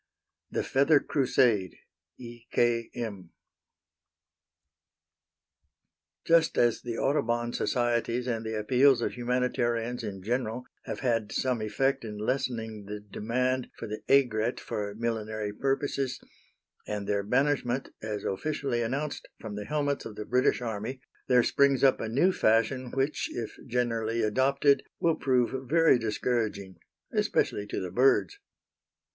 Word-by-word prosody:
THE - - -1
FEATHER 140 +3 +4
CRUSADE. 120 - +2 0.4
E. 120 -1 -11
K. 120 -1 +2
M. 100 -7 -5 3.0
Just 165 -1 +4
as 120 -1 +3
the 120 -1 -4
Audubon 120 -4 0
societies 120 0 0
and 115 -3 -2
the 110 0 -3
appeals 125 +3 +4
of - - -1
humanitarians 120 -1 -1
in 95 -3 -6
general 120 +2 -2 0.2
have - - -5
had 115 -4 0
some 125 -2 0
effect 135 +6 0
in 105 -2 -6
lessening 110 -2 -2
the 105 +1 -6
demand 125 +5 -2
for - - -6
the 105 0 -5
aigrette 120 -4 +3
for 100 -1 -4
millinery 110 -2 -3
purposes, 135 +1 -1 0.7
and 105 -1 -3
their 100 -1 +1
banishment, 130 +3 0
as 105 -2 -4
officially 135 +2 -2
announced, 135 +6 -3
from 110 -2 -7
the 105 0 -5
helmets 145 +2 -1
of 110 - -7
the 105 - -6
British 125 0 +2
army, 115 +3 -4 0.3
there 125 -1 +5
springs 140 +1 +3
up 135 - +4
a 110 - -3
new 145 +11 +3
fashion 120 -1 +2
which, 135 +4 -1
if 115 -2 -4
generally 115 -2 0
adopted, 140 +6 +3 0.2
will 165 - +3
prove 130 0 0
very 165 -4 +5
discouraging 110 -4 -2 0.4
especially 105 0 0
to - - -3
the 90 -1 -5
birds. 135 - +3
120 Hz, 130 wpm, -28 LUFS, 110-130 Hz, 3.0 s, there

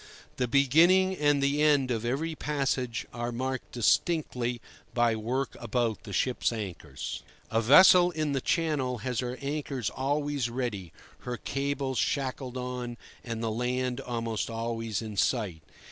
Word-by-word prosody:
The 125 - 0
beginning 165 +9 +5
and 145 -1 +2
the 140 +2 +2
end 145 -4 +4
of 115 -2 -1
every 145 +7 -1
passage 135 -6 -1
are 120 0 -3
marked 130 +2 -4
distinctly 125 -1 +1 0.4
by 120 -2 +3
work 125 +5 -2
about 120 -1 -1
the 105 - -8
ship's 125 +6 +1
anchors. 90 - -5 0.3
A 115 - +2
vessel 175 - +8
in 155 -3 -2
the 135 -1 0
Channel 145 -7 0
has 125 -3 -1
her 125 0 -3
anchors 140 -5 -2
always 145 -1 -1
ready, 115 -8 -3 0.3
her 125 -1 -5
cables 140 -2 -2
shackled 130 -2 -2
on, 125 -1 -4 0.3
and 115 -1 -4
the 115 - 0
land 125 +2 -1
almost 115 -4 -3
always 115 -1 -3
in 105 -2 -7
sight. 100 -9 0
125 Hz, 145 wpm, -29 LUFS, 115-140 Hz, 0.4 s, vessel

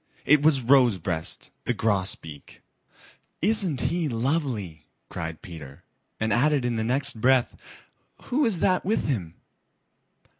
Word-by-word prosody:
It 150 0 +5
was 145 -3 +3
Rosebreast 105 - +1
the - - -1
Grosbeak. 95 -8 -2 0.8
"Isn't 190 - +2
he 160 +5 -1
lovely!"' 115 - -2 0.2
cried 80 -3 -6
Peter, 75 -6 -11 0.4
and 110 -1 0
added 140 +2 +2
in 120 -1 -1
the 110 - -1
next 130 0 0
breath, 130 -1 +3 0.7
"Who 285 +5 0
is 215 -9 +1
that 185 -2 +2
with 210 +5 0
him?" 95 - -3
125 Hz, 120 wpm, -25 LUFS, 95-150 Hz, 0.8 s, It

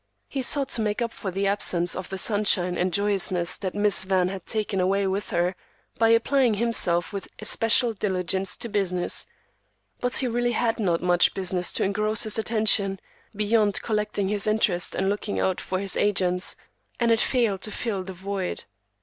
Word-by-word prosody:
He 275 - -4
sought 275 +1 +3
to 235 - -1
make 210 0 -1
up 235 -1 -2
for 195 - -5
the 195 +2 -2
absence 180 -3 +1
of 185 0 -6
the 195 - -5
sunshine 190 -3 +2
and 180 +1 -1
joyousness 190 -3 +1
that 190 -2 -4
"Miss 205 -2 +3
Van" 185 -1 +1
had 190 -2 -8
taken 215 -3 -2
away 195 +2 +1
with 195 +2 -2
her, 175 +2 0 0.4
by 225 0 +4
applying 235 +1 +3
himself 200 -6 +1
with 200 - -5
especial 225 +2 +2
diligence 190 -2 -2
to - - -3
business; 190 -4 -1 0.7
but 250 0 0
he 260 - +3
really 240 0 0
had 230 -1 0
not 175 -5 0
much 175 -1 +3
business 185 -2 0
to - - -1
engross 210 +2 +3
his 215 0 0
attention, 215 -3 +2 0.4
beyond 210 -1 +1
collecting 210 -3 -1
his 205 +1 0
interest 210 -5 +1
and 190 - -1
looking 205 +1 -2
out 190 -1 0
for 185 - -3
his 195 0 -1
agents, 185 -3 +1 0.4
and 235 -1 +2
it 225 - +3
failed 225 -8 0
to - - 0
fill 215 -3 -3
the 190 +1 -7
void. 190 0 -5
200 Hz, 180 wpm, -24 LUFS, 185-220 Hz, 0.7 s, by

